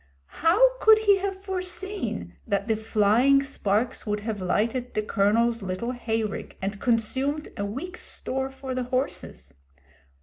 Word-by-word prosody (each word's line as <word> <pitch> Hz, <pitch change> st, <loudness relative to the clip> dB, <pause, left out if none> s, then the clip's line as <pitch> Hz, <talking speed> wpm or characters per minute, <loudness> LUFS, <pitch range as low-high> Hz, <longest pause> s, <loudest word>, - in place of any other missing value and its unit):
How -, -, +4 dB
could 440 Hz, 0 st, +7 dB
he 410 Hz, -2 st, +4 dB
have 390 Hz, 0 st, -4 dB
foreseen 380 Hz, +1 st, -4 dB
that 200 Hz, -1 st, 0 dB
the 220 Hz, -, +2 dB
flying 225 Hz, +5 st, +3 dB
sparks 230 Hz, -4 st, 0 dB
would 210 Hz, 0 st, -1 dB
have 215 Hz, -2 st, -4 dB
lighted 230 Hz, +7 st, -1 dB
the 215 Hz, -, +1 dB
Colonel's 225 Hz, +3 st, +2 dB
little 190 Hz, +5 st, -3 dB
hay 225 Hz, -3 st, -1 dB
rick 210 Hz, -, -5 dB
and 195 Hz, +1 st, -4 dB
consumed 260 Hz, +6 st, 0 dB
a 200 Hz, -3 st, -2 dB
week's 310 Hz, -, -5 dB
store 265 Hz, +1 st, -3 dB
for 265 Hz, -1 st, -6 dB
the 255 Hz, -1 st, -2 dB
horses? 255 Hz, -, -3 dB
245 Hz, 145 wpm, -26 LUFS, 215-305 Hz, -, could